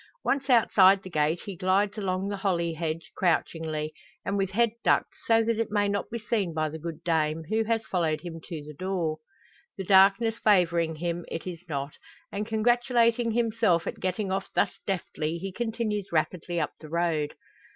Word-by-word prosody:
Once 275 0 0
outside 200 -5 +5
the 185 - -9
gate 155 +2 +1
he 200 -3 -5
glides 190 +3 +1
along 190 -2 -2
the 200 0 -3
holly 170 -4 0
hedge 160 0 -4
crouchingly, 160 -3 0 0.3
and 200 - -1
with 195 -1 0
head 230 +3 +2
ducked, - - +2
so 225 0 +5
that 225 0 0
it 230 - 0
may 205 -1 +1
not 200 0 -2
be 235 - -3
seen 210 -6 -1
by 155 0 +1
the 160 +1 -6
good 165 0 -7
dame, 160 -1 +1
who 220 +1 +2
has 225 0 0
followed 165 -4 0
him 165 -2 -7
to 160 -4 -6
the 150 +1 -9
door. 170 -1 -2 0.6
The 195 - -3
darkness 195 +4 +5
favouring 170 -6 +3
him, 170 +2 -3
it 165 - -5
is 175 -2 -6
not; 140 -1 -4 0.3
and 205 +1 -3
congratulating 235 +1 +2
himself 225 -6 +2
at - - -5
getting 190 +1 -2
off 195 0 -2
thus - - +1
deftly, 170 -4 -2
he 190 +3 -5
continues 220 -2 -2
rapidly 170 +1 -1
up 155 - -1
the 155 - -11
road. 165 -3 0
185 Hz, 185 wpm, -27 LUFS, 165-215 Hz, 0.6 s, outside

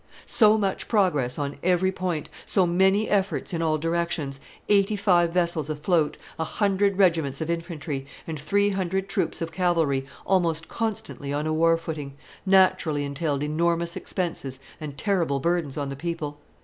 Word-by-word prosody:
So 215 -1 +5
much 195 -3 -1
progress 160 - +1
on 145 -1 -3
every 185 +1 +2
point, 180 -5 -3 0.2
so 190 -3 +3
many 190 +4 +3
efforts 200 -1 0
in 165 - -1
all 155 -1 +2
directions, 165 -3 -1 0.3
eighty 205 0 +3
five 180 -4 +3
vessels 170 -4 0
afloat, 155 0 +1 0.2
a - - +1
hundred 200 +2 +1
regiments 165 -8 +2
of 160 +1 -2
infantry, 155 -5 -4 0.2
and 160 -2 -5
three 200 +7 +2
hundred 190 0 -1
troops 170 - -1
of 165 - -5
cavalry, 165 -7 +1 0.2
almost 165 -4 +1
constantly 215 -10 -4
on 145 +1 -1
a 155 - 0
war 165 +1 +4
footing, 155 -4 -6 0.3
naturally 180 -6 +3
entailed 140 0 -2
enormous 170 +2 0
expenses 160 -7 -3 0.2
and 145 -2 -7
terrible 170 -6 +1
burdens 165 -2 -1
on 140 -2 -2
the 140 - -5
people. 150 -1 -4
170 Hz, 155 wpm, -25 LUFS, 150-190 Hz, 0.3 s, So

